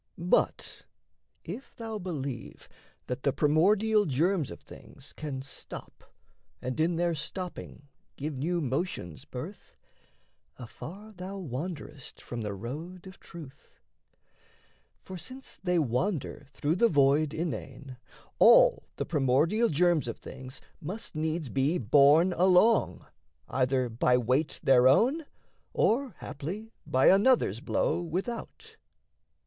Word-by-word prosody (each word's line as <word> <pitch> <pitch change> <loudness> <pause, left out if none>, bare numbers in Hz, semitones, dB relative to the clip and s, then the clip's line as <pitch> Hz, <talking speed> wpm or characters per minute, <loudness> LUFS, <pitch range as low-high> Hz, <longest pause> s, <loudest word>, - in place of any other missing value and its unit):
But 175 +1 0 0.6
if 265 - -8
thou 225 -2 -5
believe 140 - -6 0.4
That 125 +1 -4
the 140 - +2
primordial 205 +10 +3
germs 160 +3 +1
of - - -9
things - - -14
can 140 -4 -5
stop, 135 - -11 0.5
And 125 +4 -4
in 165 +2 +2
their 170 0 +1
stopping 165 -1 -6 0.3
give 150 +2 -4
new 170 +6 -1
motions 135 - -3
birth, - - -9 0.8
Afar 190 - -10
thou 190 +1 -7
wanderest 150 -3 -6
from 120 -1 -6
the 105 -2 -4
road 155 - -7
of 190 -1 -12
truth. 150 -5 -13 1.3
For 185 -1 -8
since 260 - -10
they 180 -1 +1
wander 145 - -1
through 150 +4 -1
the 235 +4 +4
void 145 -1 +3
inane, 135 - -5 0.4
All - - +6
the - - -3
primordial 155 - +2
germs 170 -2 +2
of 115 - -4
things 130 0 -10 0.2
must 200 +8 -6
needs 155 0 -2
Be 140 +7 +1
borne 145 - +5
along, 185 +6 +3 0.4
either 130 -1 +1
by 120 +2 +2
weight 130 +6 0
their 130 -1 +6
own, 270 - +3 0.5
Or 245 -2 +1
haply 195 +11 -6 0.2
by 130 +1 +2
another's 200 - +4
blow 150 - 0
without. 185 +8 -5
160 Hz, 120 wpm, -29 LUFS, 135-185 Hz, 1.3 s, All